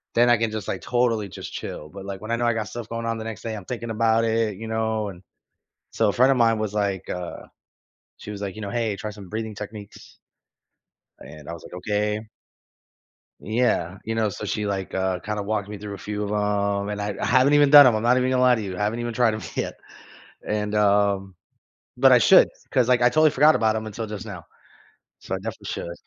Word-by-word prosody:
then 120 +1 +5
I 120 - +6
can 115 -1 -1
just, 110 -3 -5
like, 95 - -3
totally 115 -4 0
just - - -8
chill. 75 - -6
But, 95 +2 -10
like, 100 0 -6
when 110 - -8
I - - +2
know 120 - 0
I 120 - +3
got 110 -1 -3
stuff 120 -2 -7
going 115 0 -4
on 115 0 -1
the 110 - -5
next 110 -3 -6
day, 115 -1 -4
I'm 100 -4 -8
thinking 120 -2 -5
about 115 +1 +2
it, 110 -2 0
you 115 +1 -7
know, 110 -1 -1
and 90 -1 -12 0.7
so, - - +2
a - - -1
friend 130 +2 +4
of 130 - +2
mine 115 -2 +3
was, 105 -2 -2
like, 100 -3 -2
uh 90 -1 -6 0.7
she - - -9
was, 100 -1 -7
like, 100 -2 -4
you 110 - -8
know, 100 - -4
"Hey, 115 -2 -1
try 105 - -5
some 100 -3 -11
breathing 110 +1 -4
techniques" 105 -1 -10 1.0
and, 75 +1 -12
I 85 - -4
was, 85 - -10
like, - - -12
"Okay." 105 +3 -1 1.2
Yeah, 110 -6 0
you 115 0 -2
know? 110 -2 +1
So, 105 - -6
she, 105 +1 -2
like, 95 -2 -3
uh, 95 -1 -1
kinda 105 +3 -4
walked 105 -1 -2
me 105 - -6
through 100 0 -7
a - - -10
few 105 +2 -4
of 100 - -4
'em, 100 -1 0
and 105 0 -3
I 105 -1 -3
I - - 0
haven't 130 +2 +4
even 145 -1 +5
done 145 -1 +10
'em, 115 - +3
I'm 110 - -2
not 125 +2 +4
even 130 0 +1
gonna 130 -1 +2
lie 125 -1 +5
to 110 - -4
you, 95 -3 -5
I - - -4
haven't 110 +3 -1
even 120 0 -3
tried 120 -2 +2
'em 110 - -5
yet. - - -3 0.7
And, 105 0 -1
um 100 -2 +2 0.6
but 130 +1 +6
I 125 - +8
should 190 - +6 0.2
'cause, 125 -3 +2
like, 125 -1 +3
I 120 - +7
totally 155 +4 +4
forgot 150 +2 +5
about 110 -1 +2
'em 110 - -3
until 110 +1 -5
just 105 -3 -7
now. - - -8 0.7
So, - - -4
I - - -2
definitely - - -7
should. 85 - -5
110 Hz, 240 wpm, -24 LUFS, 100-115 Hz, 1.2 s, done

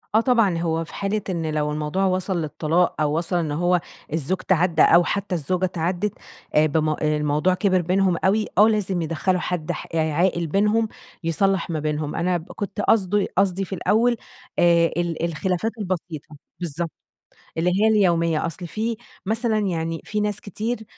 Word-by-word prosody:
آه - - +7
طبعًا، 230 -8 +3
هو 165 -1 0
في - - -14
حالة 200 +2 -1
إن 165 -4 -2
لو 150 0 0
الموضوع 150 +5 -1
وصل 185 -1 0
للطلاق، 160 +2 0
أو 150 +1 +1
وصل 170 +1 -1
إن 165 -4 0
هو 175 +3 +2 0.3
الزوج 165 +4 0
تعدّى 175 -4 +2
أو 170 +1 +6
حتّى 200 0 -2
الزوجة 180 +4 0
تعدِّت 180 +3 -1 0.4
آآ 150 - +6
بم 155 +1 +1
الموضوع 150 +2 +1
كبِر 185 -1 +2
بينهم 185 +1 +2
أوي، 210 +3 +3
آه 210 - +7
لازم 200 -5 0
يدخّلوا 165 +3 0
حد 175 -2 -2
ح - - -5
يعني 160 -1 +1
عاقل 170 +1 +1
بينهم، 210 +6 +2 0.4
يصلّح 175 +3 +1
ما 160 - -1
بينهم، 150 0 -2
أنا 180 +1 +1
ب 170 - -11
كنت 205 0 -4
قصده 205 -1 +2
قصدي 195 0 +2
في 190 - -7
الأول، 235 +6 +2 0.4
آآ 170 -1 +5
ال 170 -2 -1
الخلافات 180 +5 -1
البسيطة، 175 -6 -5 0.2
بالضبط، 170 -1 -3 0.7
اللي 170 +2 +2
هي 220 - +5
اليومية، 170 -7 +2
أصل 175 +2 -4
في 220 +5 -2 0.3
مثلًا 220 +2 0
يعني 165 -5 -2
في 210 - -2
ناس 210 -1 -1
كتير، 220 +3 -4
175 Hz, 170 wpm, -23 LUFS, 160-195 Hz, 0.7 s, آه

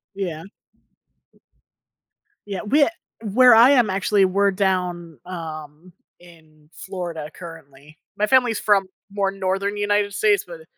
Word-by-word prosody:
Yeah. 170 -5 -5 2.0
Yeah. 195 -3 -5
Wea 285 +7 +3 0.5
where 250 -1 +7
I 240 +5 +7
am 245 -6 +3
actually, 195 +1 +2
we're 200 +2 +1
down, 180 - -2
um, 160 -1 -9 0.3
in 155 -3 -20
Florida 175 -5 -7
currently. 155 -3 -13 0.2
My 210 - 0
family's 250 -3 +2
from 200 -2 +2 0.3
more 200 -1 -1
Northern 195 +1 -2
United 205 0 0
States, 415 - +2
but, - - -11
uh, - - -15
190 Hz, 120 wpm, -21 LUFS, 165-205 Hz, 2.0 s, where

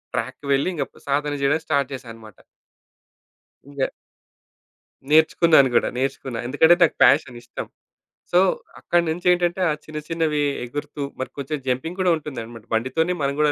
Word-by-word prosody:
ట్రాక్‌కి - - -4
వెళ్లి, 135 +5 +1
ఇంగా 140 -4 -1
అప్ - - -20
సాధన 145 +1 0
జేయడం 145 +3 +2
స్టార్ట్ 140 -3 +1
జేశానన్నమాట. 115 -5 -10 1.3
ఇంగా 140 -2 -1 1.2
నేర్చుకున్నాను 155 -2 +5
గూడా, - - +3
నేర్చుకున్నా. 130 -2 -3
ఎందుకంటే, 160 +6 +5
నాకు 170 - +4
ఫ్యాషన్ 130 -2 +4
ఇష్టం. - - -7 0.7
సో, 175 - +5 0.4
అక్కడినుంచేంటంటే 175 +1 +1
ఆ - - +2
చిన్న, 155 0 -6
చిన్నవి 160 -3 0 0.2
ఎగురుతూ 145 +3 -6 0.2
మరి 130 - -3
కొంచెం 140 +2 -3
జంపింగూడా 170 +8 0
ఉంటుందన్నమాట. 120 -7 -8
బండితోనే 145 +10 0
మనం 140 0 0
కూడా 150 -1 +4
145 Hz, 130 wpm, -22 LUFS, 130-160 Hz, 1.3 s, నేర్చుకున్నాను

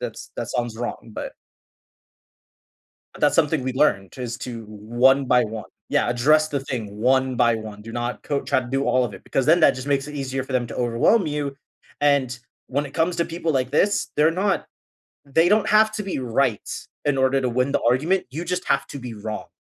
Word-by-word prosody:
that's - - -6
that - - -4
sounds 120 -2 -2
wrong, 120 - -5
but - - -5 1.9
That's - - +3
something 150 -3 +2
we 130 0 -2
learned 130 -8 +1
is 120 -2 -4
to 120 -3 -6
one 120 +6 +2
by 125 -1 +4
one 110 -1 -5 0.2
Yeah, - - +2
address 155 +6 +3
the 140 -3 -2
thing 125 -5 -4
one 130 +3 +2
by 120 -1 +3
one, 110 -2 -8
do 115 - -9
not 120 +1 -4
coat 145 -1 -2
try - - +2
to 120 - -9
do 135 +2 0
all 130 -1 +3
of 110 - -4
it - - -11
because 135 -1 -1
then 170 +3 +5
that - - +7
just 130 +2 -6
makes 140 0 +1
it 150 - -8
easier 135 -1 -3
for 130 - -8
them 125 -1 +1
to 115 - -8
overwhelm 125 - +2
you 145 -2 -3 0.4
and 140 -4 +2 0.3
when 145 +3 -1
it 140 - -10
comes 170 +1 0
to 170 - +1
people 165 -1 -2
like 130 -2 0
this, 205 +1 +2
they're 155 +2 +4
not 190 +2 0 0.6
they 160 +5 +3
don't 210 +1 +3
have 215 0 +5
to 215 - -3
be 195 -7 -3
right 125 -2 0 0.4
in 145 -2 +1
order 130 +1 +3
to 130 - 0
win 125 +3 0
the - - +2
argument, 160 +10 +2
you 160 +7 -5
just 180 +1 -2
have 140 0 +1
to 140 - -7
be 125 -2 -7
wrong. 105 0 -6
135 Hz, 215 wpm, -23 LUFS, 120-150 Hz, 1.9 s, that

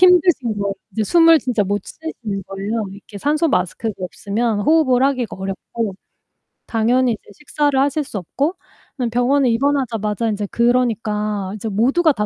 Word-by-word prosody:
힘드신 350 - +4
거예요. 200 -1 -1 0.2
이제 220 - -1
숨을 330 - +6
진짜 245 -6 0
못 205 +2 -1
쉬시는 225 -11 -6
거예요. 205 +3 -3
이렇게 200 +1 -11
산소마스크가 235 - 0
없으면 205 +4 -2
호흡을 265 -2 +3
하기가 255 -5 0
어렵고 195 +2 -4 0.7
당연히 240 +2 +2
이제 215 - -11
식사를 290 -2 0
하실 285 +2 +1
수 245 -7 -7
없고 280 - -2 0.4
그냥 245 -3 -1
병원에 250 +3 +2
입원하자마자 230 -4 0
인제 205 -1 -2
그러니까 215 -5 0
이제 215 +1 -4
모두가 265 - +3
다 210 -6 -1
235 Hz, 370 characters per minute, -20 LUFS, 210-280 Hz, 0.7 s, 숨을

